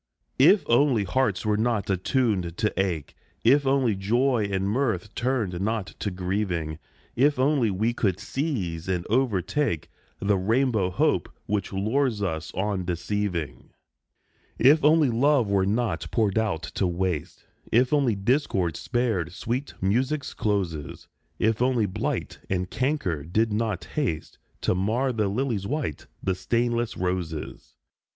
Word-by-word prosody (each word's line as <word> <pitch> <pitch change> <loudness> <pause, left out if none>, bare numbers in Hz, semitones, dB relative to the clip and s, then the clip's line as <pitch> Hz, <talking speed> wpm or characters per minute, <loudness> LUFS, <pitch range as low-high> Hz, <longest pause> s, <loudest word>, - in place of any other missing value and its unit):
If 200 -1 +6
only 120 -2 +3
hearts 105 0 0
were 105 -1 +2
not 115 -2 0
attuned 95 - 0
to 110 -1 0
ache, 90 -6 -1 0.3
If 140 +4 +4
only 135 -4 +3
joy 115 +2 +1
and 95 0 0
mirth 110 -4 -1
turned 115 -8 -1
not 110 -1 -2
to 105 - -1
grieving, 90 -4 -2 0.4
If 140 +3 +3
only 130 -3 +2
we 110 +5 0
could 100 -6 0
seize 105 - -3
and 90 -2 -1
overtake 110 - 0 0.3
The 100 -1 +1
rainbow 110 -1 +2
Hope 90 - +1 0.2
which 105 -1 -2
lures 110 +4 0
us 80 -3 -3
on 95 0 -1
deceiving! 90 -2 -3 0.9
If 145 +6 +5
only 150 -3 +5
love 125 -2 +3
were 95 -1 +2
not 105 -6 -1
poured 110 -3 +1
out 100 -7 -1
to 95 - +1
waste, 90 -3 -3 0.3
If 125 +4 +3
only 135 -7 +3
discord 100 - 0
spared 115 -9 -1
sweet 120 +9 -3
music's 130 +9 0
closes, 85 -9 -2 0.3
If 110 +1 +1
only 125 -3 +2
blight 95 - -3
and 90 -1 0
canker 130 - -1
did 105 +7 0
not 105 -4 -1
haste 125 - -3 0.2
To - - +2
mar 115 +8 0
the 110 -3 0
lily's 105 -2 -1
white, 145 - -3 0.2
the 95 - +1
stainless 120 +4 -1
roses 80 -9 -4
105 Hz, 135 wpm, -26 LUFS, 95-125 Hz, 0.9 s, If